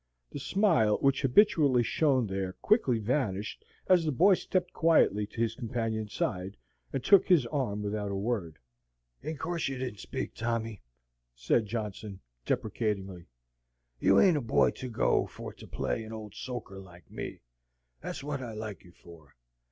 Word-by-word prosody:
The - - -6
smile 140 - +3
which 135 -1 +2
habitually 140 - +4
shone 130 0 +2
there 95 -2 -3
quickly 140 - +2
vanished 110 -3 -2 0.2
as 180 -2 +4
the 155 - 0
boy 185 +9 +5
stepped 180 0 -1
quietly 130 - +3
to 110 - -11
his 115 -1 +1
companion's 115 -3 -3
side, 95 +2 -3 0.3
and 135 -2 -3
took 200 +6 +6
his 175 -10 +5
arm 120 -6 -2
without 105 0 -2
a 100 - -3
word. 95 -6 -2 0.6
"In 155 +3 -5
course 170 +2 -2
you 135 -1 -3
didn't 125 -6 -5
speak, - - -5
Tommy," 115 -2 -3 0.5
said 65 - +1
Johnson, 105 -2 -5 0.3
deprecatingly. 100 -6 -2 0.7
"You 95 +6 +5
ain't 180 -5 +5
a - - -1
boy 115 - +3
to 130 - -7
go 115 - +1
for - - -9
to - - -13
play 115 - -2
an 110 - -9
ole 110 -2 -7
soaker 120 -6 -6
like 90 -2 -15
me. - - -6 0.6
That's - - -6
wot 140 -2 -3
I 120 -3 -6
like 110 -2 -6
you 90 - -17
for. 80 -6 -16
115 Hz, 160 wpm, -30 LUFS, 100-140 Hz, 0.7 s, took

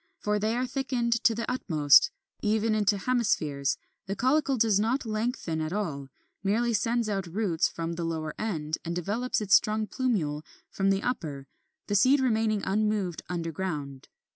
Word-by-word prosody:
For 210 0 0
they 215 +2 0
are 250 - 0
thickened 245 -3 -1
to 230 - +5
the 230 - -2
utmost, 165 - +4 0.3
even 220 +1 +1
into 210 -1 +2
hemispheres; 185 - 0 0.3
the 195 - -2
caulicle 270 +3 +2
does 215 -3 +3
not 235 +5 0
lengthen 215 -7 -2
at 155 0 -3
all; 160 -9 -3 0.4
merely 230 +4 +1
sends 230 +2 +1
out 195 -3 -2
roots 175 -2 0
from 165 0 -4
the 170 0 -4
lower 160 -2 -3
end, 160 -8 -2
and 170 0 -3
develops 215 +8 -1
its 200 -2 0
strong 215 +1 +4
plumule 200 - -1 0.3
from 195 0 +1
the 195 0 +1
upper, 150 - -3 0.4
the - - -3
seed 255 +8 +5
remaining 220 -5 +1
unmoved 210 -4 0
underground. 165 -5 -4
210 Hz, 160 wpm, -28 LUFS, 165-230 Hz, 0.4 s, to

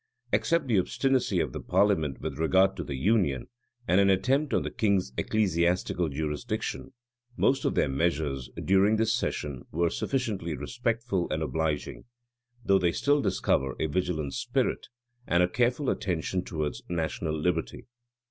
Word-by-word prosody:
Except 170 -3 +2
the 115 -7 +3
obstinacy 135 +7 +1
of - - -1
the - - -4
parliament 80 -10 +1
with - - -5
regard 95 +4 +3
to - - -4
the 70 - -5
union, 85 - +1 0.4
and 95 +3 +4
an 100 - +4
attempt 130 +10 +2
on - - +1
the - - -4
king's 100 - +1
ecclesiastical 90 - +1
jurisdiction,[*] 80 - -3 0.4
most 135 0 +2
of - - +1
their - - +3
measures, 70 -2 -1 0.2
during 95 +3 +4
this 110 0 +2
session, 75 - -2
were 85 +2 0
sufficiently 105 - -2
respectful 115 - -2
and 80 +1 -1
obliging; 80 -1 -2 0.6
though 95 0 +4
they 90 -2 +2
still 145 +9 +2
discover 90 - 0
a - - +1
vigilant 80 -3 -1
spirit, - - -1 0.4
and 85 +1 +3
a - - +3
careful 125 +7 0
attention 90 -2 -1
towards 75 -5 -3
national 80 -2 -2
liberty. 85 0 -2
90 Hz, 150 wpm, -28 LUFS, 80-110 Hz, 0.6 s, and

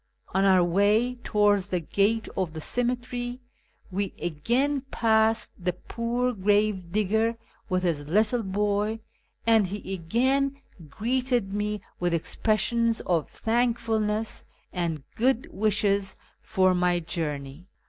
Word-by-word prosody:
On 195 +1 +2
our 185 -2 +5
way 205 +7 +3
towards 205 -2 +2
the 180 - 0
gate 205 +7 +1
of 180 -4 -1
the 160 - -5
cemetery 245 +4 -2 0.5
we 195 +1 -2
again 240 - 0
passed 220 0 +2
the 180 0 +1
poor 235 +6 -2
gravedigger 210 +2 +1 0.3
with 185 -1 0
his 170 -4 +1
little 215 +6 +3
boy, 205 +2 0 0.5
and 225 -4 +4
he 195 0 -5
again 260 +10 +1 0.3
greeted 240 - 0
me 210 0 -2 0.2
with 175 -1 +1
expressions 225 +6 +1
of 165 -5 0
thankfulness 225 -2 0 0.3
and 165 -5 -2
good 250 +1 +1
wishes 200 -1 +1 0.3
for 185 -3 +2
my 180 -1 +2
journey. 155 -1 -4
210 Hz, 115 wpm, -26 LUFS, 185-230 Hz, 0.5 s, our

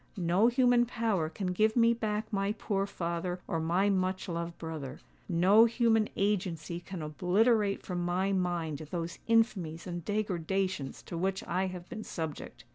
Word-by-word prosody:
No 180 +4 +3
human 245 -1 +4
power 220 -9 0
can 180 +1 -3
give 215 +3 +2
me 230 -1 +5
back 215 -1 -3
my 195 +1 +1
poor 200 -2 -1
father 175 -1 -3
or 165 -4 -1
my 175 +5 +2
much 185 0 -1
loved 170 -1 -4
brother: 160 -5 -6 0.3
no 190 +6 +6
human 230 -2 +2
agency 180 -5 -1
can 180 -2 -7
obliterate 195 - +2
from 175 -2 -2
my 185 +3 0
mind 175 -5 -1
those 170 -1 -4
infamies 195 -8 +1
and 175 -2 -5
degradations 190 -6 -2
to 170 - -5
which 190 +3 -1
I 185 0 -1
have 180 -1 -7
been 220 -2 -6
subject. 160 -4 -6
185 Hz, 155 wpm, -31 LUFS, 170-215 Hz, 0.3 s, no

